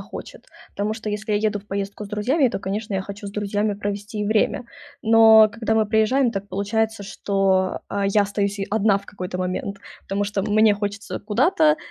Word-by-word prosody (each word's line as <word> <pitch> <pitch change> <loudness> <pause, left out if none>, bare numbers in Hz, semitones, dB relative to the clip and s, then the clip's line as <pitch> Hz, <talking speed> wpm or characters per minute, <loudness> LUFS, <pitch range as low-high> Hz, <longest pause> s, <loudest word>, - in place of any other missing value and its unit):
хочет, - - -10 0.3
тому 210 +2 -1
что 220 -1 -5
если 210 +1 -3
я 205 - +3
еду 210 -1 0
в 205 - -25
поездку 200 +1 -4
с - - -14
друзьями, 250 +7 +1
то, - - -3
конечно, 205 +2 -4
я 190 - -1
хочу 200 +1 -8
с - - -5
друзьями 205 0 -1
провести 205 +1 -4
и - - -1
время. 220 +4 +1 0.4
Но 220 -1 +7
когда 220 -1 -1
мы 220 -1 +3
приезжаем, 225 +4 +2
так 200 -1 -5
получается, 215 +2 -1
что, 195 -1 0
а, 200 -1 -1
я 205 +1 +3
остаюсь 200 0 -2
и 195 - -2
одна 210 -2 +3
в 200 - -8
какой-то 180 -3 -6
момент, 185 +2 -3 0.3
потому 200 +1 -2
что 200 -1 -2
мне 215 +1 +4
хочется 205 0 -4
куда-то, 305 - +3
205 Hz, 195 wpm, -22 LUFS, 200-220 Hz, 0.4 s, Но